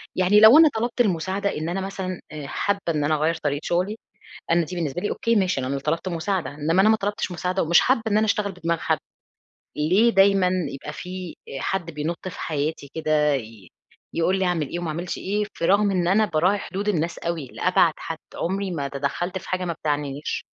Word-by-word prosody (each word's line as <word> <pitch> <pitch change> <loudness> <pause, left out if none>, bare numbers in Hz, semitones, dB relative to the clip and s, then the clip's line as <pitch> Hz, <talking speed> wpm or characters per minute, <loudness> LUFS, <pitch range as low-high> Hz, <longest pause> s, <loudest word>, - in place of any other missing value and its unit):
يعني 185 +3 +4
لو 220 +6 +9
أنا 320 -1 +8
طلبت 235 +2 0
المساعدة 195 -1 0
إن 155 +2 -3
أنا 190 +2 -2
مثلًا 190 -2 -4
آآ 150 -2 -7
حابة 200 +7 -1
إن 150 -3 0
أنا 155 +1 +2
أغير 155 +2 +1
طريقة 145 -1 0
شغلي، 185 +5 0 0.6
أنا 170 -1 +3
دي 180 - -7
بالنسبة 165 -1 -2
لي 205 - -1
أوكي 230 0 0
ماشي، 190 -7 +1
أنا 135 +2 -2
طلبت 165 +6 -2
مساعدة. 175 -2 -2
إنما 155 +6 +1
أنا 215 - +5
ما 220 - +5
طلبتش 205 -2 -2
مساعدة، 180 +2 -1
ومش 170 +2 +5
حابة 255 -2 +2
إن 210 -1 +2
أنا 215 - +3
أشتغل 205 -1 0
بدماغ 170 -2 -2
حد، - - +1 0.8
ليه 185 +10 +4
دايمًا 195 -2 +4 0.2
يبقى 140 +2 -7
في 180 +1 -7
آآ 135 - -6
حد 175 0 -2
بينط 160 +4 -4
في 180 - -9
حياتي 150 -1 -3
كده 155 -2 +2
ي 110 -7 -6 0.5
يقول 185 +3 +2
لي 190 - +1
أعمل 165 -5 0
إيه 175 - -4
وما 175 -1 -4
أعملش 170 +3 -4
إيه، 205 +2 -1
في - - -4
رغم 200 +2 +4
إن 180 -2 +1
أنا 210 +4 +4
باراعي 180 +4 +2
حدود 195 +2 -4
الناس 170 -3 0
أوي، 165 -4 -3
لأبعد 180 -2 +3
حد. 165 -1 -5 0.2
عمري 195 +2 -2
ما 145 -5 -3
تدخلت 145 +7 -3
في - - -13
حاجة 185 0 -1
ما 175 - -2
بتعنينيش. 145 -2 -3
175 Hz, 205 wpm, -24 LUFS, 155-195 Hz, 0.8 s, لو